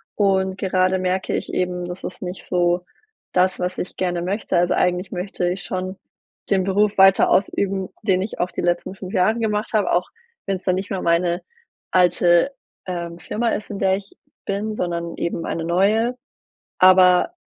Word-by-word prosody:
und 190 -2 +1
gerade 185 -1 +1
merke 185 +1 -1
ich - - -4
eben, 180 -1 -1
das 180 +1 -7
ist - - -7
nicht 180 0 -6
so 175 0 +1 0.5
das, 185 +1 +2
was 180 +1 -2
ich 180 - -5
gerne 175 -2 -1
möchte. 190 +1 -1
Also, 175 +1 +2
eigentlich 180 +1 0
möchte 180 -1 -2
ich 185 +2 -4
schon 185 +1 -4 0.5
den 190 -2 +2
Beruf 200 +2 +1
weiter 195 0 +6
ausüben, 195 0 +1
den 190 -3 +2
ich 200 - -5
auch 180 - -1
die - - -4
letzten 175 +2 -1
5 190 0 -8
Jahre 215 +4 +2
gemacht 215 0 -1
habe, 210 -2 +2
auch 175 - +1 0.4
wenn 195 -1 -1
es 185 - -19
dann 185 - +1
nicht 190 +2 -4
mehr 190 - -2
meine 170 +1 +1 0.5
alte, 175 +3 +4 0.3
ähm, 170 -2 -5
Firma 230 +5 -1
ist, 210 - -3
in 200 - -5
der 190 -1 +3
ich 200 0 -12 0.3
bin, 210 +2 -2
sondern 170 -3 -3
eben 170 -1 -3
eine 165 - -3
neue. 215 +8 +2 0.6
Aber 185 - +6
185 Hz, 180 wpm, -21 LUFS, 180-195 Hz, 0.6 s, weiter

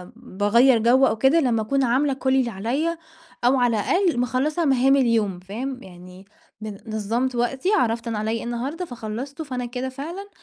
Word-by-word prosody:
باغيّر 235 +2 +3
جو 250 +4 +4
أو 220 - -1
كده 270 +8 +4
لما 240 -6 +1
أكون 270 +5 0
عاملة 265 +3 +2
كل 265 0 0
اللي 255 -3 +2
عليَّ، 265 - -2 0.5
أو 255 +2 +4
على 235 -3 +2
الأقل 355 - +1
مِخَلّصة 275 +7 0
مهام 270 0 +4
اليوم، 225 -8 +1
فاهم؟ 250 +8 -6
يعني 180 +1 -13 0.4
بن 210 -2 -6 0.2
نظمت 235 +5 -1
وقتي، 260 +8 -1
عرفت 230 -4 0
أنا 225 -2 -2
عليَّ 215 +1 -1
إيه 230 - -3
النهاردة 255 +9 -4
فخلصته، 245 +4 -6
فأنا 255 -3 -4
كده 250 +2 -4
فعلًا 335 +10 -7
245 Hz, 175 wpm, -23 LUFS, 225-270 Hz, 0.5 s, جو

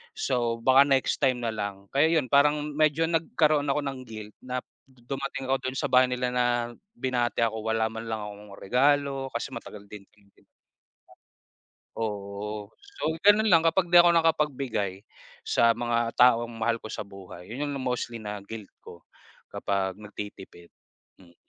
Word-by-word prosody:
So, 120 -3 -1
baka 135 +3 +6
next 135 -2 +1
time 125 -2 +2
na 115 - 0
lang, 100 -2 -5
kaya 140 +4 +4
'yon 130 -5 -6
parang 145 +1 +4
medyo 155 +1 +3
nagkaroon 155 -3 +1
ako 145 +2 +1
ng 135 -2 -4
guilt 110 -2 -9
na 125 0 -3 0.3
dumating 135 +1 -6
ako 135 - +3
doon 130 - -4
sa 145 +1 -1
bahay 130 0 +6
nila 125 0 -1
na 125 0 +1 0.5
binati 120 - 0
ako 110 -1 -2
wala 110 0 +1
man 115 0 -7
lang 110 -1 -3
akong 105 -1 -10
regalo 135 +4 +1
kasi 120 - -3
matagal 105 -3 -9
ding 100 -2 -10
hindi 100 -1 -27 1.5
Oo, 105 -1 -5
so 400 0 -12 0.2
ganun 210 +3 +5
lang 165 - +7
kapag 175 +1 +1
di 175 - +9
ako 175 0 +6
nakapagbigay 135 - 0 0.4
sa 115 -1 +3
mga 120 -1 -1
taong 120 -1 +4
mahal 115 +1 0
ko - - -9
sa 110 - -5
buhay 95 -1 -12
yun 145 +5 -3
yung 145 - -3
mostly 125 -1 -2
na 105 -2 -6
guilt 105 +1 -9
ko 85 - -13 0.5
kapag 95 0 -2
nagtitipid. 105 -4 -10 0.5
Mm. 85 -2 -19
120 Hz, 160 wpm, -27 LUFS, 105-140 Hz, 1.5 s, di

